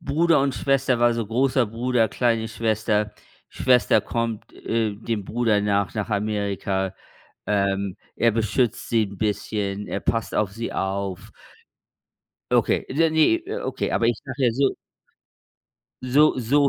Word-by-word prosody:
Bruder 165 0 +2
und 135 -1 0
Schwester 130 +1 +1
war, 120 0 +5
so 115 -2 -2
großer 130 +2 +2
Bruder, 115 +1 +1
kleine 115 0 0
Schwester, 110 -2 0 0.4
Schwester 125 -2 +3
kommt, 115 -2 -3
äh, 115 -2 -1
dem 110 -1 -4
Bruder 110 -2 +1
nach 100 -1 0
nach 105 -1 -2
Amerika. 100 -2 -1 0.5
Ähm, 100 -2 0 0.2
er 115 - +3
beschützt 115 +2 0
sie 115 -2 +2
'n 100 -1 -11
bisschen, 105 -1 -2
er - - -2
passt 115 -2 -1
auf 100 -2 0
sie 115 +2 -5
auf. 95 +1 -3 1.2
Okay, - - +2
ja 165 +1 +4
ne, 160 - +3 0.2
o - - -1
okay, - - -2
aber 115 - +1
ich 120 -2 +2
sage 135 0 -5
ja 120 - +3
so 135 +2 +1 1.3
So 140 +4 +4
so 140 +4 +3
115 Hz, 145 wpm, -23 LUFS, 105-125 Hz, 1.3 s, war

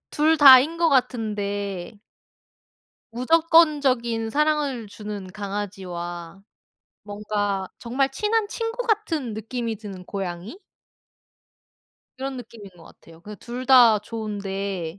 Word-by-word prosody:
둘 315 +2 +2
다인거 295 +4 +7
같은데. 205 - -2 1.1
무조건적인 265 -5 +2
사랑을 295 -4 0
주는 205 -2 -8
강아지와 190 -3 -6 0.6
뭔가 205 -2 -3
정말 265 +3 -1
친한 420 +9 0
친구 460 +2 -4
같은 330 - -1
느낌이 225 +1 -4
드는 195 -3 -10
고양이? 190 - -6 1.6
그런 265 +1 -5
느낌인 225 -5 -11
것 165 - -16
같아요. 165 0 -18
그 210 +4 -10
2 245 +4 -7
다 245 -5 +7
좋은데 200 -5 -5
225 Hz, 210 characters per minute, -23 LUFS, 200-275 Hz, 1.6 s, 다인거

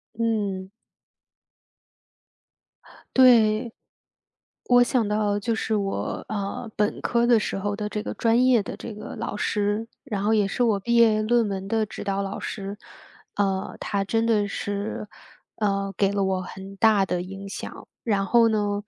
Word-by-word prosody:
嗯。 205 -5 -1 2.5
对。 230 -3 +5 0.9
我 245 0 +6
想 240 -3 +1
到， 210 -1 +1
就 225 +2 -1
是 220 0 -1
我， 195 -2 -2
呃， 205 +2 -4
本 210 0 0
科 235 -1 +2
的 235 -2 +5
时 210 - -3
候 205 +1 -2
的 210 0 -4
这 210 0 -3
个 - - -4
专 235 +2 +3
业 250 -3 +5
的 - - -7
这 230 - -7
个 210 - -8
老 - - -4
师， 210 +2 0 0.2
然 210 -8 -3
后 210 - +2
也 210 -2 +3
是 195 - -3
我 220 -4 +2
毕 235 +5 -1
业 225 -2 +5
论 235 0 +2
文 195 -1 -4
的 220 +1 +1
指 - - -7
导 195 0 -1
老 195 0 -4
师。 200 0 -5 0.6
啊， 195 -2 -1
他 200 -1 -1
真 225 +3 +1
的 210 -3 +2
是， 205 +1 -4 0.5
嗯， 195 -2 0
给 195 -1 +2
了 200 -1 0
我 190 -1 0
很 190 +2 -9
大 215 -2 +4
的 180 -2 -1
影 195 +2 -8
响， - - -7 0.2
然 205 -4 +1
后 235 +2 +5
呢， 205 -1 0
210 Hz, 175 characters per minute, -25 LUFS, 195-225 Hz, 2.5 s, 我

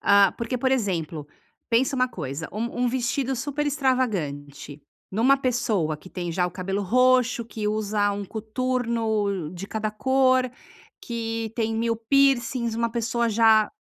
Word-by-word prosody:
Ah, 200 0 +5
porque, 235 +2 -2
por 260 +2 0
exemplo, 170 - -1 0.4
pensa 250 +4 +2
uma 255 -1 +2
coisa: 155 - -5
um 235 +4 -2
um - - +3
vestido 255 +1 -1
super 290 +3 -2
extravagante 165 - -2 0.3
numa 250 +7 +4
pessoa 225 - 0
que 185 - -14
tem 175 -2 -4
já 180 +1 +1
o - - -5
cabelo 195 +3 -3
roxo, 250 +3 +3
que 215 -2 -4
usa 210 -1 0
um 200 0 -3
coturno 220 -5 -1
de 185 +2 -7
cada 215 0 -2
cor, 260 +2 +2 0.5
que 225 -1 -4
tem 225 -1 -1
1000 230 0 0
piercings, 240 -1 +2
uma 235 0 0
pessoa 235 0 0
já 220 -1 +4
225 Hz, 145 wpm, -25 LUFS, 200-255 Hz, 0.5 s, Ah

